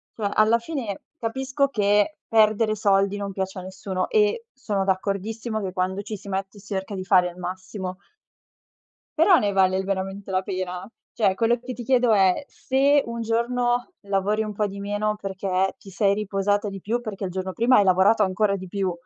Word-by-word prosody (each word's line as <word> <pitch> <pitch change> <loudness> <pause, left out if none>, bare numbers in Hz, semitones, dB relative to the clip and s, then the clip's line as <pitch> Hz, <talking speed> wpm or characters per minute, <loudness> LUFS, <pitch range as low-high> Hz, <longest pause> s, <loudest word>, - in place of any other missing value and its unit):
Cioè, 210 -3 -1
alla 220 +2 +4
fine 235 -7 -5 0.2
capisco 265 +4 0
che 210 +2 +2
perdere 215 0 +3
soldi 200 -1 +2
non 200 -1 -4
piace 190 0 -4
a - - -6
nessuno 190 0 -4
e 440 +2 +2
sono 210 -7 -2
d'accordissimo 210 +4 -2
che 190 -2 -3
quando 185 +1 -1
ci 210 0 -6
si 200 - -11
mette 195 +1 -4
si 200 +1 -8
cerca 190 +1 -3
di 185 - -4
fare 180 -2 +4
il 175 - -13
massimo 185 +1 -6 1.2
però 350 +3 +6
ne 210 -7 +1
vale 190 -1 +3
veramente 195 0 -3
la 185 0 +1
pena? 185 0 -4 0.3
Cioè, 195 -4 +2
quello 235 +2 +2
che 255 +1 -6
ti 240 - -7
chiedo 245 -2 +3
è: 190 +5 +3
se 275 +2 +2
un 235 0 -5
giorno 240 +4 0 0.2
lavori 200 +2 +1
un 210 -1 -5
po' 210 +1 0
di 200 0 -8
meno 205 +1 -1
perché 190 -1 -1
ti 195 - -14
sei 200 +1 +2
riposata 205 0 0
di 195 -1 -8
più, 230 +6 -1
perché 210 -4 -5
il 180 - -4
giorno 185 0 -4
prima 240 +5 +4
hai 205 - +6
lavorato 190 +4 +4
ancora 200 +1 +1
di 185 -1 -7
più 190 0 -1
200 Hz, 190 wpm, -24 LUFS, 190-225 Hz, 1.2 s, però